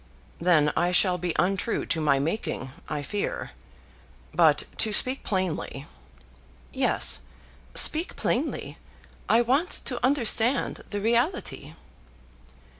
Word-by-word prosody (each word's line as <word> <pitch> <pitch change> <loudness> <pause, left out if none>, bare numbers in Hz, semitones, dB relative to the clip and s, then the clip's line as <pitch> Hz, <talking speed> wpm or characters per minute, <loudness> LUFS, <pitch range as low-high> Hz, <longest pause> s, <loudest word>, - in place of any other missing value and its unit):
"Then 160 -4 +3
I 175 - +1
shall 180 0 +2
be 175 -1 -3
untrue 195 +5 0
to 160 - -2
my 145 -3 +2
making, 140 -3 -3 0.2
I 150 -1 -3
fear. 205 +7 -4 0.8
But - - +4
to 220 - +1
speak 255 +5 +3
plainly 180 -7 -3 0.5
" - - -28 0.2
"Yes; - - +2 0.6
speak 320 +3 +5
plainly. - - -3 0.5
I 235 +2 +4
want 275 +9 +1 0.2
to 250 -2 -4
understand 250 -1 +1
the 205 -1 -4
reality." 235 - -1
200 Hz, 115 wpm, -26 LUFS, 160-240 Hz, 0.8 s, speak